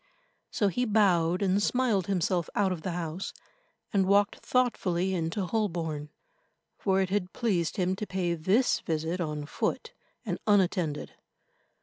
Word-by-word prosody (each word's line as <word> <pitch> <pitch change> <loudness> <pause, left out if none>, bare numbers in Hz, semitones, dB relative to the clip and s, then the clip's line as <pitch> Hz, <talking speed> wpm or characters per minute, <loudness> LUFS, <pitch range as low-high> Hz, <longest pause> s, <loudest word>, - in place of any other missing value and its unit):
So 205 - +1
he 245 +6 0
bowed 185 -5 +3
and 195 +1 +2
smiled 225 -5 +1
himself 180 -3 0
out 195 -2 +2
of 175 -3 -3
the 180 +1 -3
house, 170 +1 -4 0.6
and 195 -2 +3
walked 200 +1 +3
thoughtfully 190 -8 +1
into 175 +3 -1
Holborn, 170 -8 -2 0.7
for 190 -1 +1
it 190 -1 -1
had 190 -2 -1
pleased 195 -6 0
him 185 0 +1
to 210 - -4
pay 180 -2 -1
this 190 +10 +2
visit 160 +3 -2
on 150 -3 -3
foot, 460 - -2 0.3
and - - -2
unattended. 180 -7 +1
185 Hz, 140 wpm, -29 LUFS, 170-205 Hz, 0.7 s, bowed